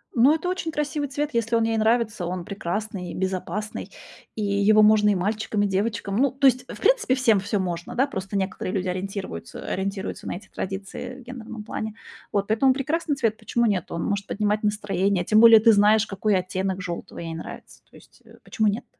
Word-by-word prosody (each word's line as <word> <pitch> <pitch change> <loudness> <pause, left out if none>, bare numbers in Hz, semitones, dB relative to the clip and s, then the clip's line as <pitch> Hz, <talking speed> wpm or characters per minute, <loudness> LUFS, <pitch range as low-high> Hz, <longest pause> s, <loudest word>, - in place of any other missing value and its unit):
Но 255 +5 +6
это 325 +3 -4
очень 360 -3 -2
красивый 295 -1 -2
цвет. 290 +2 -2
Если 230 0 +1
он 230 - +3
ей 225 0 +1
нравится, 220 -3 +1
он 180 -1 -4
прекрасный, 200 -2 -4
безопасный, 190 +3 -3 0.4
и 215 - -3
его 200 +2 +4
можно 210 0 +5
и 205 - +3
мальчикам, 210 +2 -1
и 205 - +2
девочкам. 200 +1 -1
Ну, 270 0 +3
то 275 +1 +3
есть, 255 0 +2
в - - -9
принципе, 475 - +3
всем 235 -6 +3
всё 205 +1 -1
можно, 175 -2 -4
да? 265 +3 +3
Просто 195 -5 -4
некоторые 190 -1 -3
люди 185 -1 -1
ориентирвуются 185 - -5
ориентируются 195 +1 -4
на - - -3
эти 190 - -11
традиции 195 +6 -6
в 260 - -12
гендерном 230 -3 -8
плане. 220 0 -5 0.4
Вот. 200 -1 0
Поэтому 260 +5 +3
прекрасный 295 +3 -1
цвет. 225 -5 0
Почему 235 0 0
нет? 195 -6 0
Он 170 - -3
может 200 -1 -2
поднимать 210 0 0
настроение. 200 -3 0
Тем 215 +3 +4
более 230 -1 +9
ты 225 +1 +6
знаешь, 210 +2 +5
какой 205 +1 0
оттенок 185 +1 -2
жёлтого 175 -2 -6
ей 165 -1 -5
нравится. 165 - -9
То - - -21
есть, - - -21
э, - - -18
почему 220 -2 0
нет? 205 +3 -1
210 Hz, 200 wpm, -24 LUFS, 195-230 Hz, 0.4 s, более